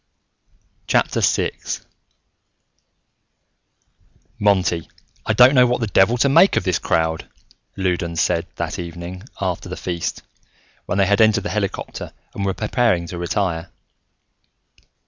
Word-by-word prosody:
VI - - +2 2.9
"Monty, 90 -5 +1 0.4
I - - +2
don't 125 +2 +7
know 125 -2 +6
what 125 0 0
the 115 - 0
devil 105 +3 +3
to 130 - +3
make 165 +8 +5
of - - +1
this 90 -2 0
crowd," 80 0 -1 0.5
Loudons 85 -3 -1
said, 85 +1 +1
that - - -4
evening, 85 +1 -7 0.2
after 95 -3 -3
the - - -6
feast, 85 -2 -4 0.6
when 90 - -1
they 100 - +4
had 100 +3 +3
entered 110 -2 +4
the 105 - -3
helicopter 100 -3 -4 0.2
and 100 - -4
were 95 -1 -1
preparing 110 -6 +1
to 90 - -6
retire. 85 -2 -2
95 Hz, 125 wpm, -21 LUFS, 85-110 Hz, 2.9 s, don't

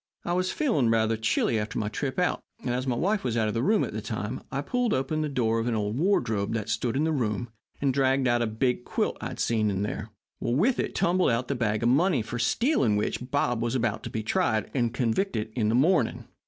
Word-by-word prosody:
I 175 - 0
was 185 +1 0
feeling 220 - +1
rather 115 0 +2
chilly 110 0 +1
after 105 0 -4
my 105 - -1
trip 130 +5 -3
out, 180 0 +1 0.2
and, 125 - 0
as 130 +2 -2
my 125 - +1
wife 200 - 0
was 120 -2 -1
out 110 -1 +2
of 105 - -1
the 115 - 0
room 210 - +3
at - - -4
the - - -3
time, - - -4
I - - -1
pulled 245 -3 0
open 135 +4 -1
the 155 - -1
door 115 -4 +1
of 115 - -1
an 120 - 0
old 105 0 -1
wardrobe 115 - +1
that 110 -1 -3
stood 120 +2 -1
in 145 - +1
the 160 - +1
room 120 -4 -1 0.3
and 140 -2 +1
dragged 135 0 +2
out 120 0 +2
a 120 - +1
big 120 +3 0
quilt - - -1
I - - -3
had - - -8
seen 110 -2 +1
in 100 0 -1
there. 105 +1 -4 0.3
With 165 - +1
it - - -2
tumbled 180 +1 +2
out 120 +1 0
the - - +1
bag 110 -4 -1
of 120 - +4
money 145 - +3
for 120 +2 -5
stealing 130 - +2
which 120 +4 -2
Bob 120 -5 0
was 120 +1 -1
to 115 0 -2
be 110 -2 -3
tried 110 0 0
and 120 -4 +1
convicted 115 - -1
in 110 -4 +1
the 115 - +2
morning. 145 -1 +2
120 Hz, 245 wpm, -27 LUFS, 110-145 Hz, 0.3 s, of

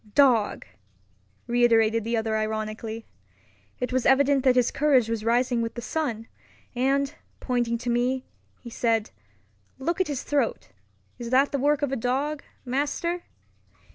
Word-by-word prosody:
"Dog!" 250 -7 +3 0.8
reiterated 230 -2 +3
the 230 +1 -1
other 220 0 -1
ironically. 220 +1 -3 0.7
It 250 0 -3
was 255 -1 +1
evident 270 0 +4
that 255 -2 +4
his 250 -2 +3
courage 275 -6 +3
was 225 -1 -2
rising 240 +1 +2
with 230 0 -3
the 240 - -5
sun; 235 -8 -3 0.5
and, 275 +3 +1 0.3
pointing 240 -2 0
to 245 +1 -4
me, 250 +2 0 0.4
he 235 - -10
said, 225 -2 0 0.7
"Look 335 +7 -1
at 375 - +1
his 285 -4 -3
throat. 270 - -1 0.5
Is 235 -1 -5
that 265 +3 +3
the 280 - -1
work 290 +2 +2
of 280 - 0
a - - 0
dog, 270 +5 -1 0.2
master?" 295 +7 -2
250 Hz, 145 wpm, -26 LUFS, 230-280 Hz, 0.8 s, evident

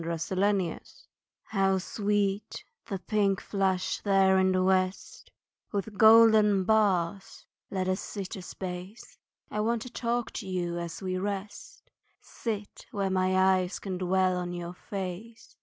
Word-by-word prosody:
A 165 0 -2
Sunset 190 +1 0
Talk - - -35 0.6
How 195 -2 +1
sweet 205 +1 -1 0.2
the 195 - -3
pink 200 0 0
flush 190 -2 -1
there 195 -1 +4
in 190 0 +3
the 185 0 +2
west, 185 0 -1 0.4
With 200 -3 -1
the 220 - -10
golden 220 -2 +6
bars 195 -3 +1 0.2
let 185 -1 -2
us 185 +1 0
sit 200 0 -6
a 190 - -7
space 180 +3 -8 0.3
I 210 - -2
want 225 +1 0
to 250 - -10
talk 240 0 -2
to 200 - -10
you 175 -2 -2
as 170 +2 -6
we 185 -1 -2
rest 200 +1 -6 0.3
Sit 210 -3 -6
where 195 -2 -2
my 185 0 +1
eyes 185 -1 +2
can 185 -2 -5
dwell 185 0 +2
on 175 0 -3
your 175 0 -5
face. 200 +4 -7
190 Hz, 150 wpm, -28 LUFS, 185-205 Hz, 0.6 s, golden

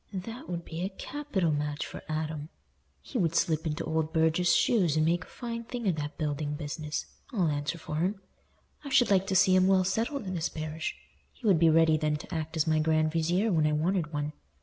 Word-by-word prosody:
"That 225 +6 -6
would 170 -1 -4
be 165 +1 -6
a 185 - -1
capital 210 - -2
match 150 0 -2
for - - -8
Adam. 155 -1 -3 0.5
He - - -4
would 165 -2 +1
slip 160 -2 +1
into 155 +1 -2
old 160 0 -1
Burge's 160 +2 +3
shoes 180 -10 +3
and 155 - +3
make 170 +1 +1
a - - -20
fine 235 -1 -5
thing 240 -2 -4
of 180 - +2
that 150 0 -4
building 150 -1 -2
business, 150 0 -4 0.3
I'll 185 - +1
answer 145 +2 -2
for 155 -1 -5
him. 190 +5 0 0.6
I 285 - -6
should 245 -4 +4
like 195 -1 +3
to 190 - 0
see 190 0 +5
him 185 0 +5
well 190 -1 +4
settled 225 +7 -1
in 185 - -3
this 170 -2 -1
parish; 155 0 -4 0.4
he 250 - -13
would 190 -6 +5
be 165 -1 +6
ready 160 0 +5
then 155 -1 0
to 150 - -8
act 160 0 -3
as 155 - +2
my 155 -1 +2
grand 155 0 +2
vizier 175 +7 +1
when 155 -3 +3
I 150 - +1
wanted 165 +1 0
one. 150 0 -3
165 Hz, 220 wpm, -29 LUFS, 155-190 Hz, 0.6 s, be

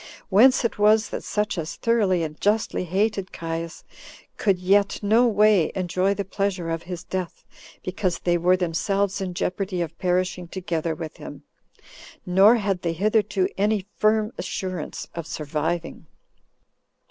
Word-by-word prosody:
Whence 245 +6 +5
it 230 - -2
was 215 +1 +4
that - - -5
such 210 -3 -1
as 160 -1 -5
thoroughly 205 -7 +1
and 155 -1 -6
justly 210 -2 +1
hated 195 +1 -1
Caius 165 0 -5 0.5
could 195 -3 +1
yet 195 +2 +2
no 225 +4 +4
way 210 -5 +4
enjoy 185 +1 0
the 200 - -3
pleasure 195 -3 -2
of 165 0 -2
his 175 0 -7
death, 185 -2 -5 0.4
because 185 -1 -1
they 175 0 0
were 180 +2 +3
themselves 195 +3 -1
in 185 -2 -4
jeopardy 185 +1 -2
of 165 -1 -3
perishing 180 0 0
together 165 -3 -3
with 155 -1 -7
him; - - -10 0.8
nor 195 +5 +6
had 195 -5 -1
they 170 -1 -1
hitherto 205 +1 +1
any 205 -1 +1
firm 215 0 +2
assurance 185 -2 -4
of 170 -2 -6
surviving. 160 +2 -3
185 Hz, 145 wpm, -24 LUFS, 170-205 Hz, 0.8 s, nor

